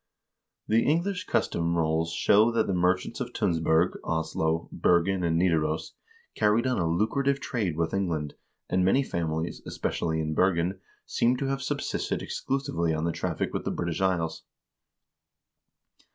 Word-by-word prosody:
The 115 +2 +3
English 175 +5 0
Custom 85 0 0
Rolls 80 0 +1
show 105 +6 +4
that 115 -1 +2
the 95 - -1
merchants 90 +4 +1
of 120 - -4
Tunsberg, 85 -3 +1
Oslo, 80 0 -1
Bergen, 90 +2 +2
and 80 -1 +1
Nidaros 80 -3 +1 0.4
carried 105 +4 +2
on 130 -4 +1
a 85 - +1
lucrative 135 +10 +1
trade 105 - -2
with 80 -1 -1
England, 85 -7 -1 0.3
and 90 0 +1
many 130 +9 +3
families, 80 -6 -3
especially 80 -1 -2
in 80 -1 -1
Ber 90 +3 +3
gen, 90 +3 -1 0.3
seem 125 +2 +1
to 135 +1 -2
have 135 0 -1
subsisted - - -2
exclusively 135 - -1
on 80 - -2
the 85 - +1
traffic - - -3
with - - -2
the - - -2
British 85 +1 -2
Isles. 90 -4 0
90 Hz, 150 wpm, -27 LUFS, 80-110 Hz, 0.4 s, show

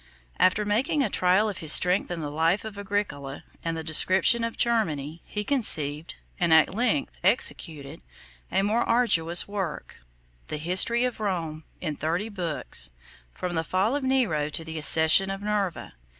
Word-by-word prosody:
After 210 +3 +2
making 255 +8 0
a 215 - -3
trial 185 +4 +2
of 205 - -5
his 155 -2 +5
strength 180 +4 +5
in 175 -2 -5
the 145 -1 -5
life 165 +7 0
of 220 -2 -8
Agricola 200 -9 -5 0.2
and 165 -1 -3
the 160 - -6
description 185 +8 +3
of 230 0 -4
Germany, 165 - -1
he 210 - -5
conceived, 160 - 0 0.2
and 175 -2 0
at 160 +2 +4
length 190 - -2
executed, 145 -4 -1 0.5
a 195 - +1
more 215 +4 0
arduous 175 -8 +2
work; 195 -6 -6 0.5
the 150 - -5
history 185 +9 +2
of 250 -3 -4
Rome, 165 -7 -4 0.2
in 155 -4 -4
thirty 170 +9 -3
books, 170 - -2 0.4
from 180 - -6
the 160 -1 -1
fall 190 - -1
of 290 - -3
Nero 225 - 0
to 165 - -4
the 160 0 -7
accession 160 +5 +5
of 195 +1 -6
Nerva. 205 -4 -3
180 Hz, 165 wpm, -25 LUFS, 160-210 Hz, 0.5 s, his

